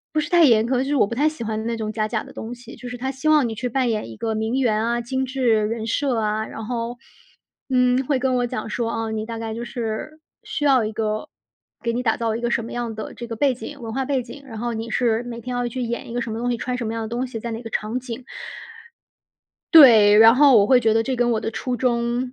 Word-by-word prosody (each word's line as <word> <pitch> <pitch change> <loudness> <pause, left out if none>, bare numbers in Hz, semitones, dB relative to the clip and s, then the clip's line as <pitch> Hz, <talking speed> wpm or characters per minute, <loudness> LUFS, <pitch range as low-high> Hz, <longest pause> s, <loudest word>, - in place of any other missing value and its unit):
不 310 - +3
是 295 - -5
太 345 -1 +5
严 225 -4 +5
苛， 255 +1 +1
就 - - -1
是 285 +1 0
我 215 - +4
不 235 - -4
太 290 +6 +3
喜 305 -7 -6
欢 220 0 -3
那 235 0 -1
种 215 -1 -3
假 215 0 -1
假 220 -2 -2
的 - - -13
东 230 +2 -6
西。 240 0 -12
就 250 - -8
是 245 - -6
他 265 +2 -3
希 270 +3 -3
望 300 -6 +4
你 225 - -4
去 250 +3 -3
扮 255 +1 0
演 215 - -2
一 110 - -10
个 225 -1 -2
名 220 +2 -2
媛 220 -4 +1
啊、 235 +1 0
精 260 +2 -2
致 245 -5 +1
人 225 0 -3
设 265 +1 0
啊， 215 0 -1
然 225 - -7
后， 235 +1 -3 0.7
嗯， 250 0 +3
会 280 -3 +1
跟 255 0 0
我 245 0 +1
讲 255 -2 -5
说： 230 0 -2
“哦， 225 -1 -3
你 215 0 -3
大 230 0 -5
概 225 -1 -4
就 235 +1 -5
是 240 +6 -5 0.2
需 295 - -4
要 265 -5 +4
一 215 - -3
个 215 -1 -2 0.5
给 235 - 0
你 245 +2 -2
打 225 -3 +1
造 225 -2 -1
一 - - -5
个 240 0 -1
什 230 - 0
么 230 - -8
样 240 -2 -3
的 215 - -6
这 235 - -7
个 230 -1 -6
背 275 +1 +2
景 280 +3 -9
文 225 - -5
化 265 +3 -1
背 265 -1 0
景， 280 +4 -11
然 225 -4 -8
后 240 +1 -2
你 225 +1 -4
是 230 0 +1
每 235 -1 -7
天 250 +2 -5
要 245 0 -1
去 250 +1 -4
演 235 0 -4
一 - - -6
个 245 - -1
什 230 - -5
么 225 - -4
东 245 +1 -1
西、 240 - 0
穿 250 +2 -3
什 240 -3 -4
么 225 - -3
样 225 - -3
的 220 - -4
东 240 +3 -2
西、 245 -3 -6
在 235 +2 -5
哪 225 +1 -5
个 225 - -7
场 220 +4 -2
景。” 245 0 -7 1.5
对， 225 -9 +9
然 225 +2 +8
后 275 -2 +6
我 200 - +5
会 255 +1 +5
觉 225 -2 +2
得 225 - +3
这 260 +3 -2
跟 245 -1 +1
我 225 -2 +1
的 - - -3
初 250 +2 -3
衷 240 +1 0
235 Hz, 305 characters per minute, -22 LUFS, 225-255 Hz, 1.5 s, 对